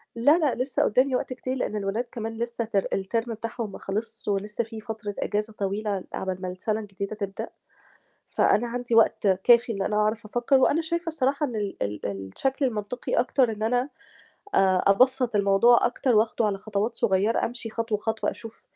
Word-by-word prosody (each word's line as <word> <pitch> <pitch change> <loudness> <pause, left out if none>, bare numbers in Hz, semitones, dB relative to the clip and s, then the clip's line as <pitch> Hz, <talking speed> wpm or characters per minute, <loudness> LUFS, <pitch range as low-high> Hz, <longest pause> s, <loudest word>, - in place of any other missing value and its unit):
لا، 285 +8 +5
لأ، 300 -6 +1
لسّه 255 +1 0
قُدّامي 255 +4 +2
وقت 255 - -2
كتير 255 +1 -4
لإن 245 -4 -2
الولاد 205 +3 -1
كمان 225 -1 -4
لسّه 235 0 -2
ter 200 -3 0
الterm 225 +5 -2
بتاعهم 225 -1 -5
ما - - -9
خلصش 215 +4 -4
ولسّه 210 +3 -1
فيه 225 0 -9
فترة 215 -2 -6
إجازة 210 +1 -2
طويلة 200 -1 -2
عقبال 185 -1 -3
ما 185 - -3
السَنة 210 +4 -2
الجديدة 200 0 -5
تبدأ، 200 -2 -5 0.8
فأنا 240 +3 +2
عندي 245 0 -2
وقت 225 -2 +4
كافي 235 +6 +4
إن 200 -3 -3
أنا 210 +2 -1
أعرف 215 +1 +1
أفكّر 240 +5 +1
وأنا 285 +5 +3
شايفة 335 +2 -3
الصراحة 290 -2 0
إن 245 -5 -5
ال 205 -2 -3
ال 105 +1 -4
الشكل 100 - -2
المنطقي 225 0 -3
أكتر 255 -1 +2
إن 215 0 -5
أنا 245 +4 +1 0.7
آآ، 185 -1 +4
أبسَّط 250 +3 +3
الموضوع 200 +4 +5
أكتر 245 0 +1
وآخده 220 +1 +2
على 200 -2 -1
خطوات 210 +2 -2
صغيّرة، 195 +4 +1
أمشي 235 -1 -7
خطوة، 225 -1 -1
خطوة 220 +1 -1
أشوف 225 -1 -11
220 Hz, 180 wpm, -26 LUFS, 200-245 Hz, 0.8 s, لا